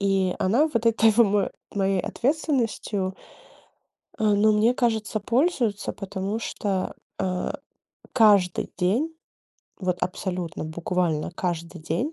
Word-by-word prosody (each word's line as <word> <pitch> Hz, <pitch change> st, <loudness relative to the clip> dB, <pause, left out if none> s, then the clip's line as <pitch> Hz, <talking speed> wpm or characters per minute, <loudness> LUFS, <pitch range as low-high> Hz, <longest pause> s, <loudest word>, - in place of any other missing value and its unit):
И 195 Hz, -2 st, +1 dB
она 240 Hz, +12 st, +3 dB
вот 230 Hz, -1 st, 0 dB
этой 225 Hz, -1 st, +5 dB
в 215 Hz, -, -5 dB
мо 205 Hz, -4 st, +4 dB, 0.2 s
моей 195 Hz, -1 st, +1 dB
ответственностью, 235 Hz, -, -1 dB, 1.0 s
э, -, -, -1 dB
ну, 210 Hz, +1 st, +4 dB
мне 220 Hz, +4 st, +3 dB
кажется, 220 Hz, -3 st, 0 dB
пользуется, 240 Hz, -, 0 dB
потому 195 Hz, +1 st, -4 dB
что, 195 Hz, -4 st, -2 dB, 0.3 s
э, 185 Hz, -1 st, -1 dB, 0.6 s
каждый 205 Hz, -7 st, +4 dB
день, 230 Hz, -, +1 dB, 0.7 s
вот 180 Hz, -2 st, -1 dB
абсолютно 180 Hz, -3 st, -3 dB
буквально 165 Hz, 0 st, -1 dB
каждый 170 Hz, -1 st, -4 dB
день 170 Hz, -, -2 dB
200 Hz, 115 wpm, -25 LUFS, 180-225 Hz, 1.0 s, этой